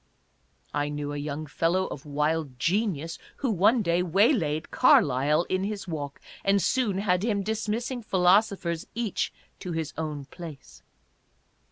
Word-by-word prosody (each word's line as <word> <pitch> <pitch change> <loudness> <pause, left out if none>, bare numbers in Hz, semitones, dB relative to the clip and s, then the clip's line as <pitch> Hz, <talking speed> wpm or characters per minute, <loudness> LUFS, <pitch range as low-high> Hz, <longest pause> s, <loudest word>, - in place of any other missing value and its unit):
I 145 0 0
knew 145 0 -4
a - - -4
young 145 +1 -4
fellow 170 +5 +1
of 150 -3 -7
wild 150 -2 -1
genius 165 - 0 0.2
who 265 -4 0
one 215 +5 +4
day 170 0 +2
waylaid 180 - +2
Car - - +6
lyle 145 +4 +1
in 185 +1 -1
his 205 -1 -4
walk 145 -4 -5 0.2
and 200 0 +3
soon 215 -2 +1
had 180 -2 +1
him 205 -2 0
dismissing 225 +4 -2
philosophers 185 -3 +2
each 230 -3 -1 0.3
to 180 - -5
his 160 -2 -3
own 150 -3 -4
place. 145 - -11
170 Hz, 145 wpm, -27 LUFS, 150-200 Hz, 0.3 s, Car